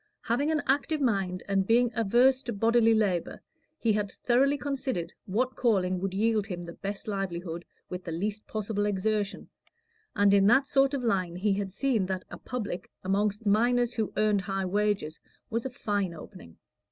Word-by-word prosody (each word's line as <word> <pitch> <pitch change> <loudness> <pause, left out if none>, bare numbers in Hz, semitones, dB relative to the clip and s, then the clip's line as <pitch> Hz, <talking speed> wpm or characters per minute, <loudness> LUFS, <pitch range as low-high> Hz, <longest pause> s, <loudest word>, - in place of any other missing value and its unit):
Having 260 +6 0
an 310 -2 +1
active 290 +3 +1
mind, 195 -8 0
and 195 -1 +1
being 240 +1 +4
averse 240 +4 +3
to 240 -3 -4
bodily 225 +2 +4
labor, 195 -6 0 0.4
he 230 -7 +1
had 205 -1 -1
thoroughly 270 +4 +2
considered 260 -12 -3
what 250 +6 0
calling 185 -6 +1
would 195 +1 -2
yield 215 +1 +1
him 175 -4 -5
the 170 0 -8
best 200 +3 -6
livelihood 175 -4 -3 0.2
with 180 0 -6
the 170 - -5
least 205 +6 -3
possible 210 -1 -2
exertion, 205 +1 -1 0.7
and 205 -1 +4
in 200 -1 +5
that 265 +5 +5
sort 275 0 +2
of 260 - -3
line 185 -6 0
he 200 +3 +1
had 195 -1 -3
seen 225 -3 0
that 185 -1 -3
a - - -8
"public" 210 -8 -5
amongst 205 +3 0
miners 240 +3 +3
who 220 -3 -2
earned 210 -2 +3
high 195 0 -2
wages 200 -4 0 0.3
was 230 +3 -1
a - - -6
fine 205 -7 -2
opening. 155 - -12
210 Hz, 175 wpm, -28 LUFS, 190-240 Hz, 0.7 s, in